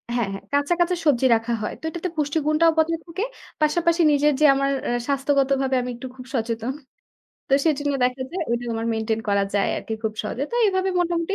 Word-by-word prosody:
হ্যাঁ, 235 -5 0
হ্যাঁ 195 - -7
কাঁচা, 285 +4 +2
কাঁচা 350 +1 +2
সবজি 265 -3 +3
রাখা 225 +1 -1
হয়। 210 - -3
তো - - -39
এটাতে 340 +3 -4
পুষ্টিগুণটাও 305 +2 +2
বজায় 325 +1 +2
থাকে। 350 +5 -4 0.4
পাশাপাশি 335 +3 +2
নিজের 295 +1 +3
যে 305 - +5
আমার 275 0 +1 0.2
আ - - 0 0.2
স্বাস্থ্যগতভাবে 275 -1 +1
আমি 250 - -4
একটু 245 +2 -7
খুব 255 -1 -10
সচেতন। 230 +1 -2 0.8
তো - - -4
সেজন্য 290 -2 +1
দেখা 250 +1 0
যায়, 355 +1 -3
ওটা 240 +1 -1
আমার 225 0 -2
মেইনটেইন 220 0 -1
করা 200 0 +2
যায় 200 - +2
আরকি - - -5
খুব 220 -1 -1
সহজে। 225 +5 -4
তো - - -5
এভাবে 375 -1 +1
মোটামুটি 345 +2 0
280 Hz, 195 wpm, -23 LUFS, 240-330 Hz, 0.8 s, যে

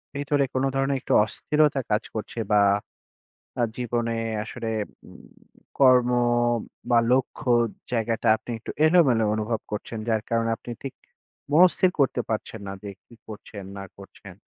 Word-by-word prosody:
ভিতরে 145 0 +1
কোনো 130 +1 +1
ধরনের 135 +1 +1
একটু - - -1
অস্থিরতা 150 +4 +1
কাজ 105 +2 +2
করছে? 110 +2 -6
বা, 105 - +5 1.0
আ - - +3
জীবনে 120 -1 -1 0.3
আসলে 115 0 -6 0.4
উম - - -15 0.5
কর্ম 125 -2 +5 0.8
বা, 120 - +5
লক্ষ্য 130 +1 0 0.4
জায়গাটা, 115 0 0
আপনি - - -11
একটু - - -8 0.2
এলোমেলো 140 -10 +4
অনুভব 110 +1 -2
করছেন, 105 +2 -5
যার 110 -2 +1
কারণে 115 0 +1
আপনি 120 - -11
ঠিক 135 - -6 0.6
মনস্থির 180 +3 +5
করতে 130 -2 +2
পারছেন 110 0 -4
না - - -4
যে, 105 - -7 0.2
কি - - -18
করছেন 105 -1 -9
না 100 - -6
করছেন? 100 -1 -13
120 Hz, 140 wpm, -25 LUFS, 110-135 Hz, 1.0 s, বা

